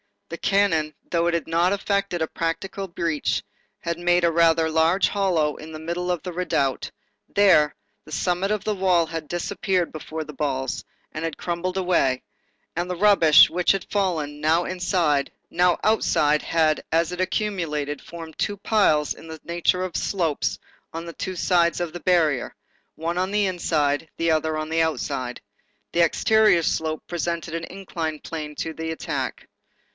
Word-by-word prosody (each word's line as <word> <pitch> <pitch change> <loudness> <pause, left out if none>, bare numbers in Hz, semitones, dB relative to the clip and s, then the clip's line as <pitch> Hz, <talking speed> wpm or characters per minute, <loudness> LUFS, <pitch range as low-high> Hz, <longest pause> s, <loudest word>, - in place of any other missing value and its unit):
The - - -5
cannon, 165 -7 +1 0.2
though 170 0 +2
it 175 - +1
had 170 - -1
not 170 +3 +2
effected 200 -3 -1
a - - -1
practicable 190 +5 -3
breach, 170 -3 -1 0.4
had 170 0 -3
made 175 0 +3
a 170 - +4
rather 165 -1 +4
large 160 +4 +3
hollow 175 -7 +1
in 160 +1 -10
the - - -5
middle 170 +3 -3
of 175 -3 -1
the 180 - -4
redoubt; 145 -7 -1 0.4
there, 180 -7 +4 0.3
the 155 - -10
summit 180 +3 0
of 210 -1 -1
the 215 - 0
wall 185 -4 +3
had 160 -1 -6
disappeared 180 +1 -1
before 155 0 -5
the 150 - -10
balls, 135 -2 -2 0.3
and 155 - -5
had 165 -2 -3
crumbled 180 +2 -3
away; 170 -9 +1 0.5
and 175 +2 -2
the 180 - -2
rubbish 175 -5 +7
which 180 +2 +2
had 195 - -3
fallen, 160 -8 -1
now 160 +3 +3
inside, 175 -6 0 0.2
now 180 0 +3
outside, 150 -8 +3
had, 160 -2 +1
as 165 +1 +2
it 180 +1 -3
accumulated, 165 -8 -2
formed 165 -2 -10
two 205 - -1
piles 195 -8 +2
in - - -13
the 160 0 -8
nature 175 +2 0
of 180 -4 -3
slopes 165 -7 -1 0.4
on 165 +1 -5
the 170 - -7
two 185 +3 -4
sides 170 -1 +2
of 175 -2 -2
the 175 - -5
barrier, 160 -8 +1 0.4
one 165 +2 -3
on 185 +1 0
the 205 0 +2
inside, 160 -5 0
the 165 0 +1
other 155 0 +1
on 155 0 -3
the 165 +1 +2
outside. 140 -6 -2 0.5
The 170 - -1
exterior 215 0 +4
slope 155 0 -1
presented 170 -2 -3
an 165 0 -3
inclined 165 -5 -5
plane 150 -2 -6
to 160 - -4
the 160 +1 -4
attack. 160 - -4
170 Hz, 170 wpm, -24 LUFS, 155-180 Hz, 0.5 s, rubbish